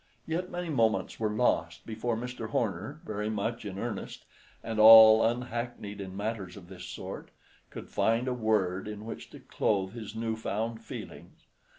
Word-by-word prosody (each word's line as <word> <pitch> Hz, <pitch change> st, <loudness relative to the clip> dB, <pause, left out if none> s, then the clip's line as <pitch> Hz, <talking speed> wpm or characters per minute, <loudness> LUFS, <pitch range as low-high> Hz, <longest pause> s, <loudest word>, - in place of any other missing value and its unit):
Yet 175 Hz, +3 st, -2 dB
many 175 Hz, -1 st, -4 dB
moments 115 Hz, -7 st, +1 dB
were 110 Hz, -1 st, +1 dB
lost 90 Hz, -6 st, 0 dB
before 115 Hz, +1 st, -2 dB
Mr. 120 Hz, -1 st, -5 dB
Horner, 110 Hz, -, -2 dB
very 105 Hz, +1 st, -3 dB
much 110 Hz, +2 st, -3 dB
in 95 Hz, -2 st, -5 dB
earnest, 110 Hz, -1 st, -5 dB, 0.4 s
and 110 Hz, -1 st, -3 dB
all 110 Hz, 0 st, +10 dB
unhackneyed 120 Hz, -3 st, -3 dB
in 95 Hz, 0 st, -7 dB
matters 100 Hz, -3 st, -4 dB
of 90 Hz, -3 st, -13 dB
this 95 Hz, -2 st, -9 dB
sort, -, -, -7 dB, 0.4 s
could -, -, -9 dB
find 115 Hz, +3 st, +1 dB
a 125 Hz, -, +1 dB
word 105 Hz, -6 st, 0 dB
in 105 Hz, 0 st, -7 dB
which 115 Hz, -, -7 dB
to -, -, -12 dB
clothe 95 Hz, -2 st, -1 dB
his 110 Hz, -2 st, -8 dB
new 110 Hz, 0 st, -2 dB
found 110 Hz, +1 st, -3 dB
feelings. -, -, -10 dB
110 Hz, 165 wpm, -29 LUFS, 100-115 Hz, 0.4 s, all